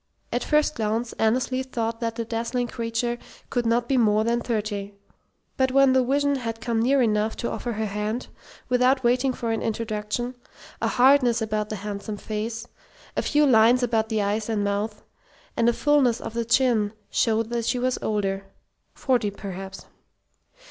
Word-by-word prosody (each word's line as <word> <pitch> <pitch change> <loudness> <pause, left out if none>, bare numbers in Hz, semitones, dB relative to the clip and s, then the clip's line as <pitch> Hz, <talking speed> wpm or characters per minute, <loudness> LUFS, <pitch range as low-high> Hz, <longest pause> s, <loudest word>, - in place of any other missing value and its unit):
At - - -1
first 300 0 +2
glance 225 0 -2
Annesley 255 +3 +1
thought 230 -3 -3
that 230 -1 -2
the 230 - -3
dazzling 235 +2 -2
creature 235 0 -2 0.3
could 240 -1 0
not 235 +1 +1
be 270 - +2
more 215 -2 +3
than 235 +1 +1
thirty; 205 -3 -3 0.6
but 260 0 +3
when 270 0 +5
the 260 -1 +4
vision 285 +2 +1
had 230 -3 -4
come 225 0 -1
near 265 +2 +3
enough 215 -1 +1
to 235 - -3
offer 240 - -3
her 220 0 -2
hand, 210 +4 -3 0.4
without 255 +1 +3
waiting 250 +2 +2
for 235 -2 -3
an 225 - -1
introduction, 220 +2 -2 0.5
a - - +1
hardness 250 -2 +4
about 215 -1 -2
the 215 - -3
handsome 205 +1 -5
face, 220 +3 -4 0.5
a - - +1
few 295 0 +3
lines 245 0 +5
about 225 -2 +1
the 215 -2 0
eyes 210 +2 -1
and 215 -2 0
mouth, 205 +1 -2 0.5
and 235 0 +3
a - - +2
fullness 270 -4 +3
of - - -6
the 235 0 -1
chin 230 -3 +2 0.2
showed 225 0 +1
that 235 -1 -1
she 250 - +1
was 255 +1 0
older 195 -2 -1 0.5
forty, 245 -6 +1
perhaps. 195 -1 -8
230 Hz, 170 wpm, -25 LUFS, 215-250 Hz, 0.6 s, when